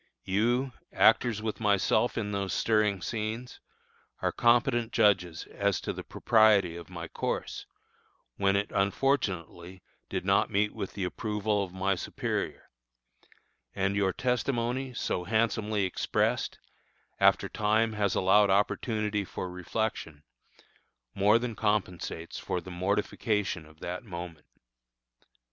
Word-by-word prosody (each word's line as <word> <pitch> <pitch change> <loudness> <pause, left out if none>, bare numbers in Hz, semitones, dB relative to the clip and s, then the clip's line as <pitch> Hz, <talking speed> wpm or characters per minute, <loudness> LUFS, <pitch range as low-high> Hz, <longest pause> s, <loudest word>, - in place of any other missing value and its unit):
You, 120 +7 +1 0.2
actors 110 -3 +3
with 110 -1 -3
myself 105 +2 +2
in 105 -2 -2
those 100 -2 -2
stirring 105 -4 +1
scenes, 115 +5 -4 0.6
are - - 0
competent 120 -1 +2
judges 90 -7 +2
as 100 -2 0
to - - -3
the - - -7
propriety 110 -6 +3
of 85 +1 -9
my 85 -2 -6
course, - - -4 0.7
when 100 0 +2
it 100 +1 0
unfortunately 95 - -1 0.3
did - - -3
not - - +3
meet 105 +1 +1
with 100 -4 -5
the 100 - -3
approval 105 +2 -1
of 95 - -7
my 95 +2 0
superior; 90 - -4 1.0
and 95 +1 0
your 100 -2 +2
testimony, 125 +2 -1
so 90 - -1
handsomely 110 -1 +1
expressed, 95 - 0 0.6
after - - +4
time 110 +1 +1
has 105 -2 0
allowed 100 +2 +4
opportunity 105 +1 +1
for 90 -1 -6
reflection, 90 -4 -3 0.9
more 105 +3 +4
than 120 0 -3
compensates 90 -6 -2
for 90 - -2
the 90 +2 -10
mortification 100 -1 -1
of 80 0 -20
that 90 +1 -5
moment. 85 -6 -8
105 Hz, 120 wpm, -29 LUFS, 95-110 Hz, 1.0 s, after